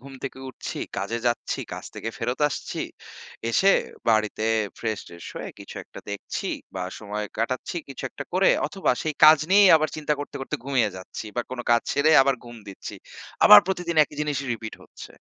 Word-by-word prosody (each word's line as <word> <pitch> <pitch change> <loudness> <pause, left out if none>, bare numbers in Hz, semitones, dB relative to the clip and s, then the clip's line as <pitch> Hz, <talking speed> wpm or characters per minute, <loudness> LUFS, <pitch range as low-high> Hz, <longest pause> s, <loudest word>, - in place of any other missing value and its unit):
ঘুম 135 +2 -12
থেকে - - -5
উঠছি, 130 - -7 0.2
কাজে 105 +5 -2
যাচ্ছি, 120 0 -1
কাজ - - -6
থেকে 115 - -5
ফেরত 125 +1 -2
আসছি। 145 - -4 0.7
এসে 195 +11 +5 0.4
বাড়িতে 110 -1 +2 0.3
ফ্রেশ-ট্রেশ 105 -6 -5
হয়ে - - -5
কিছু - - -10
একটা - - -12
দেখছি 100 - -5 0.3
বা 95 - -3 0.2
সময় 105 0 -4
কাটাচ্ছি 125 +8 -2
কিছু 135 - -8
একটা - - -7
করে। 185 +2 +4 0.2
অথবা 195 - -1
সেই 155 -3 -2
কাজ 155 0 +9
নিয়েই 200 0 +7
আবার 155 0 0
চিন্তা 150 -1 -1
করতে, 145 - -6
করতে 145 +3 -3
ঘুমিয়ে 130 -6 +1
যাচ্ছি 95 +4 -8
বা - - +2
কোন 130 - -6
কাজ 120 0 +4
ছেড়ে 145 +3 +3
আবার 135 0 +2
ঘুম 120 -1 -10
দিচ্ছি। 95 - -8 0.5
আবার 105 - +12
প্রতিদিন 180 -3 -2
একই 150 - -15
জিনিসই 145 -2 -2
repeat 110 -1 -6
হচ্ছে। - - -12
130 Hz, 175 wpm, -25 LUFS, 110-155 Hz, 0.7 s, আবার